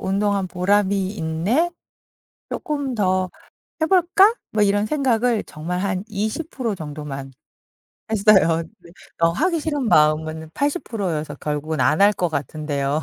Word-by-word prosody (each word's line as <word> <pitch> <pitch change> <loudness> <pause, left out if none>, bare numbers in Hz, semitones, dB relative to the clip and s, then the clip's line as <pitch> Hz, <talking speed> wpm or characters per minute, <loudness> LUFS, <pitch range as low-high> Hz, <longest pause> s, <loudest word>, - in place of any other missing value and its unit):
운동한 195 0 0
보람이 195 +1 +1
있네. 200 - 0 0.8
쪼끔 285 -4 -3
더 185 -3 +1 0.5
해 - - +4
볼까?' 380 +4 +5 0.2
뭐 215 - +1
이런 205 +1 +2
생각을 245 -4 +1
정말 170 +4 -4
한 190 -1 -1
20% 220 - -3
정도만 145 -4 -7 0.8
했어요. 195 -6 +4 0.2
네. 170 -1 -17 0.3
어 165 - +5
하기 335 - 0
싫은 290 -6 -1
마음은 155 0 +2
80% 245 - -2
여서 150 -1 -4
결국은 150 +2 -3
안 160 - +3
할 205 +1 +6
것 175 -3 -1
같은데요. 145 0 -2
195 Hz, 230 characters per minute, -22 LUFS, 160-230 Hz, 0.8 s, 할